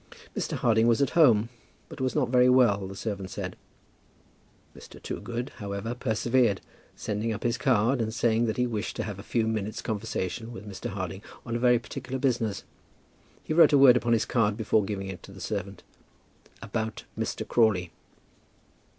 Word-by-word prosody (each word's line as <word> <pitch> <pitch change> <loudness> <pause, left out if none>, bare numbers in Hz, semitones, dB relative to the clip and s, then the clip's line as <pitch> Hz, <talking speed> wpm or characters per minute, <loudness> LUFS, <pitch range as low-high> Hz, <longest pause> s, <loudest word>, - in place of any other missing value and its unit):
Mr. - - -2
Harding 115 -1 +3
was 115 -1 +3
at 140 -2 +1
home, 120 -9 +5 0.4
but - - -9
was 130 -1 -1
not 135 -5 +1
very 125 0 +5
well, 110 -7 +4
the 95 - -8
servant 100 -2 -4
said. 95 -3 -5 1.2
Mr. - - -13
Toogood, 120 +3 -5
however, 100 +3 -4
persevered, 120 -3 +1 0.4
sending 110 +2 -2
up 110 - -4
his 120 0 +1
card, 125 -1 +2
and 110 -1 -1
saying 115 0 +1
that 110 - -2
he 125 - +2
wished 110 -3 -3
to - - -2
have 105 -3 -6
a - - -6
few 110 +2 0
minutes' 110 -1 -2
conversation 110 +1 -3
with 110 -3 -9
Mr. 105 +4 -6
Harding 95 -2 -5 0.2
on 115 -1 -3
very 125 0 +5
particular 130 +2 -6
business. 120 -6 0 0.8
He - - -3
wrote 165 -1 +6
a - - +7
word 135 -2 +8
upon 120 -1 +2
his 115 - +2
card 110 -4 +1
before 110 -1 +2
giving 100 -1 -4
it 95 -1 -7
to - - -13
the 95 - -12
servant, 100 0 -5 0.8
"about 110 +1 -3
Mr. - - -3
Crawley." 100 -7 +2
115 Hz, 175 wpm, -27 LUFS, 100-120 Hz, 1.2 s, word